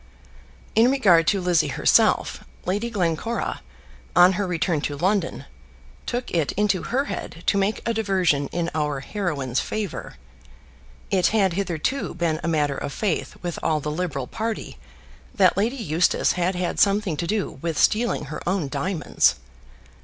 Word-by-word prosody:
In 230 +3 +5
regard 185 -12 +4
to 200 - +3
Lizzie 175 -4 +2
herself, 140 - +2 0.2
Lady 205 +6 -1
Glencora, 200 +2 -2 0.5
on 180 +1 +7
her 195 +1 -1
return 170 -3 0
to 145 0 -3
London, 190 +5 0 0.6
took 245 +1 -3
it 165 -4 0
into 200 -2 +1
her 270 +3 -1
head 165 -10 -6
to - - +2
make 200 +2 0
a 230 - +1
diversion 185 -10 +1
in 170 +2 -2
our 150 -3 -1
heroine's 140 - -2
favour. 210 - -4 1.0
It 185 -3 +3
had 195 -5 +2
hitherto 190 - -2
been 165 -2 0
a - - -2
matter 150 -4 +1
of 145 - -4
faith 195 +2 -2
with 175 -1 -3
all 155 -1 +1
the 150 +1 -3
Liberal 155 -5 -3
party 225 - -4 0.6
that 185 -3 +4
Lady 220 +7 0
Eustace 175 - +2
had 180 +1 0
had 180 -1 -2
something 200 -4 +2
to 170 - -2
do 200 -8 -2
with 165 -3 -2
stealing 225 -8 +2
her 150 - -6
own 180 -7 -1
diamonds. 150 - +1
180 Hz, 155 wpm, -24 LUFS, 155-205 Hz, 1.0 s, on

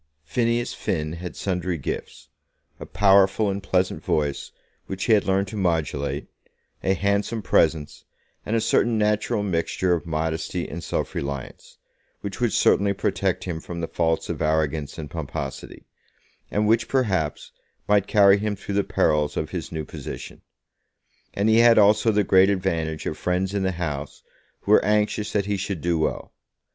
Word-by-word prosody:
Phineas 115 +8 0
Finn 75 -3 -2
had 90 +1 -7
sundry 90 -2 -2
gifts, 70 - -6 0.5
a - - -8
powerful 100 +1 +4
and 100 +1 -4
pleasant 95 -1 0
voice, 75 -2 -1 0.4
which 95 0 -4
he 115 - +3
had 105 - +3
learned 95 +1 +1
to 110 - -7
modulate, 75 -7 -1 0.6
a 95 - +1
handsome 100 +4 -1
presence, 80 -4 +1 0.4
and 110 - -2
a 115 - +2
certain 115 +1 +2
natural 105 +1 +1
mixture 90 -1 0
of 85 0 -2
modesty 80 +2 -2
and 85 +1 -7
self - - -3
reliance, 70 -1 -6 0.4
which 100 +3 -6
would 120 -3 +2
certainly 100 +1 +3
protect - - -1
him 85 -3 -4
from 85 +1 -7
the 85 - -2
faults 80 -1 0
of - - -4
arrogance 75 -1 0
and 75 -3 -7
pomposity, 70 -4 -6 0.6
and 105 +1 0
which, 115 +1 +3
perhaps, 95 - -1 0.4
might 100 -1 +3
carry 100 -1 +5
him 105 0 -1
through 100 +1 -6
the 100 0 +2
perils 75 -4 +1
of 75 - -3
his 85 -4 -5
new 80 -2 -4
position. - - -8 0.9
And 100 +2 +1
he 110 +1 +5
had 120 0 +6
also 105 +2 +5
the 105 -1 +2
great 95 0 +5
advantage 85 -5 -1
of 75 - -4
friends 90 +2 -1
in 100 - 0
the 95 0 0
House 75 -4 -5 0.4
who - - -2
were - - +6
anxious 105 0 +1
that 100 -2 +1
he 100 0 -1
should 100 -2 -3
do 85 0 0
well. 80 - -2
95 Hz, 165 wpm, -24 LUFS, 80-105 Hz, 0.9 s, had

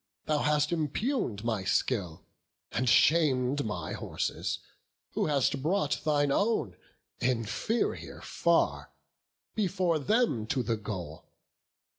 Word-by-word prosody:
thou 150 -1 +1
hast 150 +1 +2
impugn'd 160 - -1
my 110 -4 -1
skill, 95 -4 -1 0.5
And 125 +1 +1
sham'd 140 -1 +4
my 90 -8 -4
horses, - - -2 0.5
who - - 0
hast 140 -2 +1
brought 160 -1 0
thine 145 -2 +2
own, 200 - +1 0.4
Inferior 125 - -1
far, - - +1 0.6
before 185 -5 +1
them 205 - +1
to 130 +2 0
the 115 0 0
goal. 90 -7 -6
140 Hz, 105 wpm, -30 LUFS, 115-160 Hz, 0.6 s, sham'd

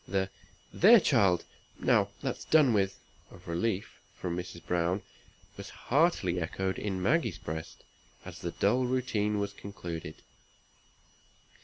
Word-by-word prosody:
The 95 0 -1 0.4
"There! 225 +6 +8
child; 100 - +3 0.3
now - - +3
that's - - -3
done 150 -6 +5
with," 95 -2 +1 0.3
of - - -16
relief, 95 +4 -2 0.2
from 90 -2 -4
Mrs. 90 -1 -7
Browne, 90 +2 0 0.5
was - - -8
heartily 130 - +1
echoed 95 +3 -2
in 95 -3 -3
Maggie's 155 - +1
breast, 80 +1 -7 0.4
as - - -9
the - - -4
dull 125 +6 +1
routine 110 -5 0
was 100 0 -2
concluded. 85 -6 -7
100 Hz, 125 wpm, -30 LUFS, 90-120 Hz, 0.5 s, There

